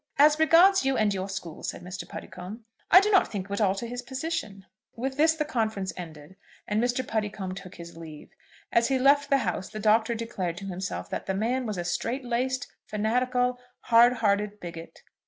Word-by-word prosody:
"As 300 Hz, +2 st, +6 dB
regards 345 Hz, +4 st, +6 dB
you 270 Hz, 0 st, +1 dB
and 210 Hz, -2 st, +2 dB
your 190 Hz, 0 st, -3 dB
school," 175 Hz, -4 st, -6 dB
said -, -, -5 dB
Mr. 180 Hz, +1 st, -7 dB
Puddicombe, 200 Hz, +6 st, -9 dB, 0.2 s
"I 370 Hz, -, +9 dB
do 420 Hz, +1 st, +1 dB
not 385 Hz, -, +4 dB
think 200 Hz, -3 st, -3 dB
it -, -, -17 dB
would 200 Hz, -, -1 dB
alter 200 Hz, +2 st, +1 dB
his 245 Hz, +1 st, -5 dB
position." 245 Hz, -, -4 dB, 0.3 s
With 265 Hz, +3 st, -3 dB
this 320 Hz, +3 st, +4 dB
the 305 Hz, -1 st, -1 dB
conference 220 Hz, -9 st, -2 dB
ended, 165 Hz, 0 st, -10 dB, 0.3 s
and 215 Hz, +2 st, +1 dB
Mr. 245 Hz, +1 st, -1 dB
Puddicombe 210 Hz, -4 st, -3 dB
took 185 Hz, -1 st, -10 dB
his 170 Hz, -1 st, -10 dB
leave. 160 Hz, -2 st, -11 dB, 0.4 s
As 235 Hz, 0 st, +3 dB
he 270 Hz, -, +1 dB
left 280 Hz, +2 st, +4 dB
the 275 Hz, -, +5 dB
house 185 Hz, +1 st, -2 dB
the 215 Hz, -, -7 dB
Doctor 220 Hz, +2 st, +3 dB
declared 190 Hz, -7 st, -4 dB
to 195 Hz, -, -7 dB
himself 185 Hz, 0 st, -4 dB
that -, -, -4 dB
the 190 Hz, -, -1 dB
man 240 Hz, +5 st, -1 dB
was 210 Hz, -3 st, -3 dB
a 175 Hz, -, -3 dB
strait 240 Hz, +9 st, -2 dB
laced, 255 Hz, +3 st, -1 dB, 0.2 s
fanatical, 250 Hz, +3 st, 0 dB, 0.2 s
hard 240 Hz, +1 st, +6 dB
hearted 210 Hz, -2 st, 0 dB
bigot. 170 Hz, -2 st, -9 dB
220 Hz, 195 wpm, -27 LUFS, 190-255 Hz, 0.4 s, I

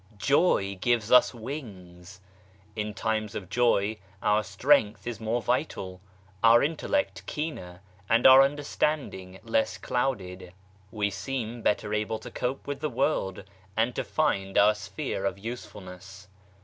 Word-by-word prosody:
Joy 100 Hz, -, +2 dB
gives 120 Hz, -3 st, +1 dB
us 125 Hz, -, +7 dB
wings! 95 Hz, -, -9 dB, 0.5 s
In 105 Hz, -1 st, -4 dB
times 110 Hz, -1 st, -2 dB
of 95 Hz, -3 st, -6 dB
joy 110 Hz, -2 st, +2 dB, 0.3 s
our 105 Hz, +1 st, +3 dB
strength 105 Hz, +2 st, +2 dB
is 120 Hz, -3 st, -5 dB
more 115 Hz, +2 st, -1 dB
vital, 95 Hz, -8 st, -2 dB, 0.4 s
our 115 Hz, +1 st, +7 dB
intellect 165 Hz, -, -1 dB
keener, 95 Hz, -, -5 dB, 0.3 s
and 115 Hz, +2 st, +3 dB
our 130 Hz, 0 st, +10 dB
understand 145 Hz, +1 st, 0 dB
ing 95 Hz, 0 st, -10 dB
less 110 Hz, -1 st, 0 dB
clouded. 95 Hz, -8 st, -3 dB, 0.4 s
We 105 Hz, -2 st, -1 dB
seem 115 Hz, +3 st, -4 dB
better 105 Hz, -1 st, 0 dB
able 105 Hz, +1 st, -1 dB
to -, -, -10 dB
cope 125 Hz, +2 st, -3 dB
with 140 Hz, -1 st, -4 dB
the 155 Hz, +1 st, -2 dB
world 115 Hz, -8 st, -1 dB, 0.3 s
and 115 Hz, +2 st, +2 dB
to -, -, -2 dB
find 95 Hz, -11 st, -1 dB
our 105 Hz, +1 st, +6 dB
sphere 105 Hz, -1 st, -5 dB
of -, -, -1 dB
usefulness. 95 Hz, -3 st, -9 dB
110 Hz, 135 wpm, -27 LUFS, 100-125 Hz, 0.5 s, our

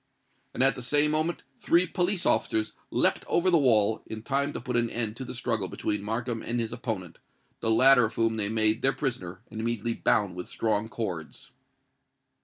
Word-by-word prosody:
And -, -, +2 dB
at 135 Hz, -, +5 dB
the 125 Hz, -, -8 dB
same 145 Hz, +4 st, +3 dB
moment 155 Hz, +3 st, -1 dB, 0.2 s
three 170 Hz, +2 st, +3 dB
police 180 Hz, +1 st, -1 dB
officers 110 Hz, 0 st, +1 dB, 0.2 s
leapt -, -, +1 dB
over 185 Hz, +2 st, +2 dB
the 170 Hz, -, +5 dB
wall, 110 Hz, -5 st, +3 dB
in 110 Hz, 0 st, -7 dB
time 140 Hz, +3 st, 0 dB
to -, -, -4 dB
put 125 Hz, -, -4 dB
an 120 Hz, -1 st, +2 dB
end 115 Hz, -2 st, -2 dB
to 130 Hz, -, -5 dB
the 125 Hz, -, -7 dB
struggle 110 Hz, -5 st, -1 dB
between 105 Hz, +3 st, -2 dB
Markham 115 Hz, +2 st, -3 dB
and 120 Hz, +1 st, -2 dB
his 115 Hz, -1 st, -3 dB
opponent, 95 Hz, -9 st, -5 dB, 0.4 s
the 115 Hz, -, -1 dB
latter 125 Hz, +2 st, +6 dB
of 110 Hz, 0 st, -5 dB
whom 115 Hz, -1 st, +1 dB
they 100 Hz, -2 st, +1 dB
made 110 Hz, +1 st, +2 dB
their 135 Hz, +1 st, +2 dB
prisoner 95 Hz, -10 st, -4 dB
and 110 Hz, -, -5 dB
immediately 115 Hz, 0 st, -1 dB
bound 105 Hz, -4 st, +1 dB
with 90 Hz, 0 st, -7 dB
strong 110 Hz, -1 st, -1 dB
cords. 90 Hz, -10 st, -6 dB
115 Hz, 195 wpm, -27 LUFS, 110-135 Hz, 0.4 s, latter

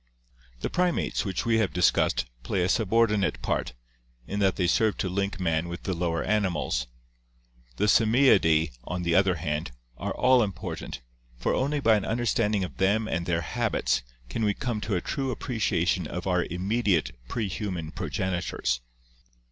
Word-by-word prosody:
The -, -, -1 dB
primates 180 Hz, -8 st, 0 dB
which 95 Hz, -3 st, -2 dB
we 115 Hz, -1 st, +3 dB
have 105 Hz, -4 st, 0 dB
dis 90 Hz, -, +4 dB
cussed -, -, +1 dB, 0.2 s
play 90 Hz, -, -1 dB
a 90 Hz, -, +1 dB
subordinate 105 Hz, -, +2 dB
part, -, -, -1 dB, 0.5 s
in 100 Hz, -, -3 dB
that 95 Hz, -2 st, +3 dB
they 90 Hz, -, 0 dB
serve 110 Hz, +4 st, +2 dB
to 95 Hz, -, -1 dB
link 100 Hz, 0 st, -2 dB
man 80 Hz, -2 st, 0 dB
with 85 Hz, +1 st, -6 dB
the 95 Hz, -, -1 dB
lower 85 Hz, -1 st, -1 dB
animals; 90 Hz, -, 0 dB, 0.9 s
the -, -, -2 dB
Simiidae, 110 Hz, -, +4 dB
on 90 Hz, +1 st, -4 dB
the 85 Hz, -1 st, +1 dB
other 95 Hz, 0 st, +4 dB
hand, 75 Hz, -1 st, -2 dB, 0.3 s
are -, -, -3 dB
all 130 Hz, 0 st, +5 dB
impor 105 Hz, -5 st, -2 dB
tant, -, -, -7 dB, 0.4 s
for -, -, 0 dB
only 145 Hz, +3 st, 0 dB
by 115 Hz, -5 st, +4 dB
an 100 Hz, -, -3 dB
understanding 110 Hz, -3 st, +1 dB
of 90 Hz, -, -6 dB
them 105 Hz, +3 st, +2 dB
and 85 Hz, -2 st, -2 dB
their 85 Hz, -1 st, +1 dB
habits -, -, 0 dB, 0.3 s
can 110 Hz, -, -3 dB
we 105 Hz, -2 st, +2 dB
come 115 Hz, -4 st, -3 dB
to 105 Hz, -2 st, -1 dB
a 90 Hz, -, 0 dB
true 135 Hz, +7 st, -2 dB
appreciation 100 Hz, -, 0 dB
of 90 Hz, +3 st, -5 dB
our 90 Hz, -2 st, +1 dB
immediate 95 Hz, -, 0 dB, 0.2 s
prehuman 95 Hz, -7 st, -3 dB
progeni 90 Hz, -1 st, -2 dB
tors. -, -, -1 dB
95 Hz, 170 wpm, -27 LUFS, 85-110 Hz, 0.9 s, all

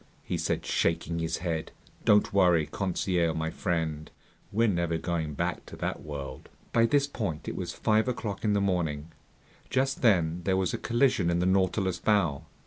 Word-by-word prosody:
he -, -, -3 dB
said, -, -, -1 dB
shaking 85 Hz, 0 st, 0 dB
his 80 Hz, 0 st, -1 dB
head. 80 Hz, -2 st, -2 dB, 0.3 s
"Don't 105 Hz, -1 st, +4 dB
worry, 90 Hz, -5 st, +4 dB
Conseil 90 Hz, -3 st, 0 dB
my 80 Hz, 0 st, -2 dB
friend, 80 Hz, -5 st, -2 dB, 0.4 s
we're 115 Hz, +3 st, +3 dB
never 85 Hz, -4 st, 0 dB
going 80 Hz, -3 st, -2 dB
back -, -, -2 dB
to -, -, -9 dB
that -, -, -3 dB
world!" 70 Hz, -3 st, -7 dB, 0.2 s
By 115 Hz, 0 st, +4 dB
this 140 Hz, +3 st, +3 dB
point 100 Hz, -, -4 dB
it -, -, -3 dB
was -, -, -4 dB
five 110 Hz, +2 st, +1 dB
o'clock 110 Hz, -5 st, -3 dB
in 105 Hz, -2 st, +2 dB
the 100 Hz, -, +2 dB
morning. 85 Hz, -5 st, -1 dB, 0.6 s
Just 135 Hz, +1 st, 0 dB
then 90 Hz, -7 st, +3 dB
there 95 Hz, 0 st, +1 dB
was 95 Hz, -2 st, 0 dB
a -, -, -2 dB
collision 120 Hz, -7 st, +2 dB
in 85 Hz, -, +1 dB
the 90 Hz, -, +1 dB
Nautilus's 95 Hz, 0 st, +1 dB
bow. 85 Hz, -7 st, +1 dB
90 Hz, 175 wpm, -28 LUFS, 80-105 Hz, 0.6 s, Don't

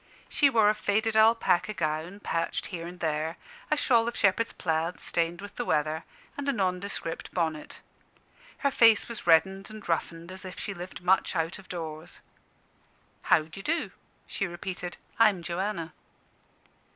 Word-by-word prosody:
She 285 Hz, -, +4 dB
wore 225 Hz, -5 st, +4 dB
a 210 Hz, -, +5 dB
faded 215 Hz, +1 st, 0 dB
alpaca 220 Hz, -3 st, +4 dB
gown, 165 Hz, +4 st, -2 dB
patched 165 Hz, -3 st, -1 dB
here 170 Hz, -1 st, -4 dB
and 180 Hz, +1 st, -10 dB
there, 160 Hz, +1 st, -1 dB, 0.3 s
a 305 Hz, -, +2 dB
shawl 235 Hz, -5 st, +3 dB
of 235 Hz, -, -3 dB
shepherd's 205 Hz, +3 st, +2 dB
plaid 165 Hz, +1 st, -1 dB
stained 170 Hz, +2 st, -1 dB
with 205 Hz, 0 st, -10 dB
the 245 Hz, -, -1 dB
weather, 155 Hz, -4 st, 0 dB, 0.3 s
and 285 Hz, 0 st, -2 dB
a -, -, +5 dB
nondescript 185 Hz, -5 st, -2 dB
bonnet. 160 Hz, -4 st, -2 dB, 0.8 s
Her 280 Hz, -, +4 dB
face 225 Hz, -4 st, +6 dB
was 235 Hz, -6 st, -5 dB
red 165 Hz, +1 st, +7 dB
and 195 Hz, +3 st, -9 dB
roughened, 165 Hz, +1 st, -2 dB
as 190 Hz, +1 st, -6 dB
if 185 Hz, 0 st, -8 dB
she 200 Hz, -, -4 dB
lived 180 Hz, -1 st, -8 dB
much 190 Hz, +1 st, +3 dB
out 165 Hz, +2 st, -1 dB
of 195 Hz, -, -16 dB
doors. 160 Hz, -3 st, -6 dB, 1.1 s
"How 155 Hz, -, +6 dB
d'ye 160 Hz, +5 st, -9 dB
do?" 330 Hz, +10 st, -1 dB, 0.3 s
she 200 Hz, -, -2 dB
repeated 180 Hz, 0 st, -5 dB, 0.2 s
"I'm 205 Hz, -6 st, +5 dB
Joanna." 175 Hz, -1 st, -3 dB
185 Hz, 155 wpm, -28 LUFS, 165-215 Hz, 1.1 s, red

